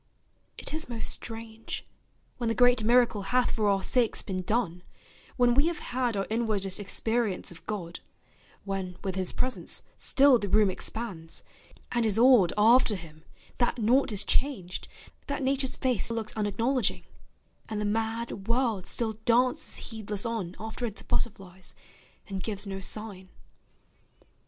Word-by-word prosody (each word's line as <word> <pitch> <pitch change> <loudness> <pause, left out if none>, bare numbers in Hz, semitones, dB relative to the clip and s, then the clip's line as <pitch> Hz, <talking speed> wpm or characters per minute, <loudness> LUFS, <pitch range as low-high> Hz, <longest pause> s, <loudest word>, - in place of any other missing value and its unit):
It - - -2
is 315 -3 -2
most 230 -2 +1
strange, 225 -1 -5 0.5
when 240 - -2
the 225 - 0
great 245 -2 +5
miracle 235 -2 +4
Hath 245 +6 +1
for 215 -2 +1
our 195 -1 +1
sakes 240 0 +2
been 185 -2 -3
done, 185 -3 -1 0.6
when 245 -1 +4
we 280 +6 +4
have 340 -2 -1
had 245 -3 -2
Our 195 - 0
inwardest 215 -4 0
experience 220 -1 0
of 170 - -13
God, 180 -5 -4 0.7
When 190 -2 -4
with 190 -2 -2
his 185 -1 0
presence 255 0 -1
still 275 -3 +5
the 205 - -3
room 210 -1 +4
expands, 185 -5 -4 0.5
And 240 -1 +1
is 215 -2 +3
awed 235 -7 +6
after 225 +1 +5
him, 160 -3 -11 0.3
that 240 0 +1
naught 240 +3 +3
is 205 -1 +5
changed, 210 -11 -1 0.4
That 280 0 -2
Nature's 265 0 +1
face 250 -6 +1
looks 225 -2 -3
unacknowledging, 220 +3 0 0.7
And 215 -1 -3
the 210 - -1
mad 225 -1 -2
world 230 -5 0
still 230 -2 +1
dances 245 +2 +2
heedless 210 -2 -3
on 215 -6 -3
After 220 +2 -4
its 215 - -7
butterflies, 190 -5 -3 0.5
and 195 -1 -4
gives 205 -1 -1
no 195 -1 -5
sign. 195 -1 -4
220 Hz, 145 wpm, -28 LUFS, 195-240 Hz, 0.7 s, awed